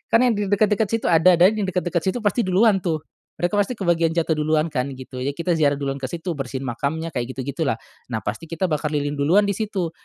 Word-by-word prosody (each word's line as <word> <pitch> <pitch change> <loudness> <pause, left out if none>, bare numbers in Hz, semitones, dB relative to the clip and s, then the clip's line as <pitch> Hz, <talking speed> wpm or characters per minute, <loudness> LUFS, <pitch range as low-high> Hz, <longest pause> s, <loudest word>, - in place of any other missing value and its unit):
kan 230 - +6
yang 250 - +4
di 205 - 0
deket-deket 210 +2 +2
situ 225 +3 -1
ada, 170 +2 +6
dan 175 +3 +6
yang 205 - 0
deket-deket 180 -1 -1
situ 190 +8 -1
pasti 210 +1 +1
duluan 195 +2 +4
tuh. 165 -4 -2 0.4
Mereka 175 +4 +1
pasti 205 +5 +1
kebagian 170 -5 +1
jatuh 160 -2 0
duluan 155 +1 +1
kan, 125 -3 -1
gitu. 130 0 -9
Ya, 140 +2 -2
kita 170 0 -1
ziarah 145 -2 +3
duluan 140 -1 -3
ke 130 - -3
situ, 170 +5 -5
bersihin 130 0 -4
makamnya, 140 +7 -3
kayak 125 -2 -4
gitu-gitu 140 +4 -3
lah. 135 - +2 0.3
Nah, 110 -3 -4
pasti 110 +12 -4
kita 170 +2 -2
bakar 150 0 -1
lilin 145 0 -1
duluan 170 +9 +4
di 200 - 0
situ. 200 -6 -2
165 Hz, 235 wpm, -22 LUFS, 140-190 Hz, 0.4 s, kan